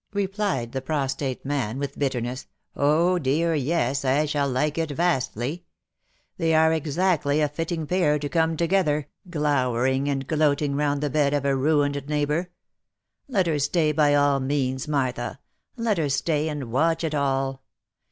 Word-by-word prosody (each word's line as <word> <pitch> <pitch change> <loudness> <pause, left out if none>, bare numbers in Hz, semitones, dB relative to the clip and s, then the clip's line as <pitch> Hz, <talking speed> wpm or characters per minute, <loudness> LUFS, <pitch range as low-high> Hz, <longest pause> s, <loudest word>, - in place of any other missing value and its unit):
replied 195 - -1
the 135 - -3
prostrate 135 -2 -2
man, 135 -5 -2
with 140 0 -5
bitterness, 130 -2 -2
" - - -48
Oh! 165 +5 +3
dear 160 +4 +1
yes, 140 -2 0
I 140 +3 +2
shall 145 -2 0
like 150 +5 0
it 165 -1 -1
vastly! 145 -2 -1 0.7
They 165 -2 +2
are 160 0 +4
exactly 155 -1 +1
a 150 - +3
fitting 160 +2 -3
pair 160 -3 +2
to 145 0 -3
come 160 +1 +1
to 170 - +1
gether, 155 -6 +1 0.2
glowering 135 -3 +1
and 135 -1 -2
gloating 150 -1 +1
round 145 0 0
the 145 -2 -1
bed 145 -1 +2
of 140 -1 -1
a 140 -1 +2
ruined 145 0 +1
neighbour. 150 +4 0 0.8
Let 200 -9 +1
her 155 -3 0
stay, 155 +2 +2
by 145 -1 +3
all 145 -1 +3
means, 130 +1 -1
Martha, 130 -4 -1 0.4
let 230 -5 0
her 150 -3 0
stay 150 +3 0
and 140 -6 -5
watch 165 +6 +1
it 160 -2 -1
all. 135 -2 -1
145 Hz, 160 wpm, -24 LUFS, 135-160 Hz, 0.8 s, are